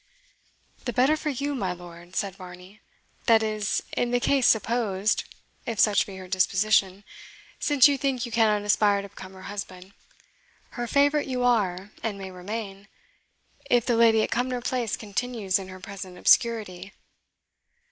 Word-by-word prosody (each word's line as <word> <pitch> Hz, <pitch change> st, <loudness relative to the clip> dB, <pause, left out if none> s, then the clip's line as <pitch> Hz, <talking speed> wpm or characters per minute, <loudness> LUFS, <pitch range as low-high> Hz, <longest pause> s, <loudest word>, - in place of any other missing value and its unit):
"The 245 Hz, -, -2 dB
better 265 Hz, +6 st, +3 dB
for 305 Hz, 0 st, -3 dB
you, 285 Hz, +1 st, -2 dB
my 195 Hz, -9 st, -2 dB
lord," 175 Hz, 0 st, -13 dB
said 200 Hz, -3 st, -1 dB
Varney 185 Hz, +2 st, -12 dB, 0.5 s
"that 225 Hz, -2 st, +5 dB
is, 215 Hz, -2 st, -1 dB
in 245 Hz, -, 0 dB
the 245 Hz, 0 st, +1 dB
case 270 Hz, +1 st, +2 dB
supposed, 220 Hz, -3 st, +1 dB, 0.4 s
if 230 Hz, -3 st, -3 dB
such 210 Hz, -2 st, +4 dB
be 195 Hz, -, -9 dB
her 185 Hz, -1 st, -9 dB
disposition; 190 Hz, +1 st, +2 dB, 0.6 s
since 290 Hz, -3 st, +5 dB
you 280 Hz, -1 st, 0 dB
think 260 Hz, -3 st, -1 dB
you 235 Hz, -, -8 dB
cannot 215 Hz, -2 st, +2 dB
aspire 205 Hz, -1 st, +2 dB
to 200 Hz, -, -9 dB
become 190 Hz, -1 st, -11 dB
her 190 Hz, 0 st, -13 dB
husband. 190 Hz, -2 st, -8 dB, 0.8 s
Her 240 Hz, -1 st, -4 dB
favourite 285 Hz, +3 st, +2 dB
you 250 Hz, -2 st, -2 dB
are, 205 Hz, -5 st, +1 dB
and 215 Hz, -3 st, -3 dB
may 190 Hz, -1 st, -7 dB
remain, 200 Hz, +2 st, -7 dB, 0.8 s
if 245 Hz, -2 st, +3 dB
the 240 Hz, -, +1 dB
lady 225 Hz, -1 st, +5 dB
at -, -, -3 dB
Cumnor 245 Hz, +1 st, -1 dB
place 240 Hz, -3 st, -2 dB
continues 210 Hz, -2 st, -2 dB
in 190 Hz, -, -8 dB
her 185 Hz, 0 st, -10 dB
present 190 Hz, -2 st, -9 dB
obscurity." 205 Hz, -4 st, +2 dB
210 Hz, 155 wpm, -26 LUFS, 190-240 Hz, 0.8 s, that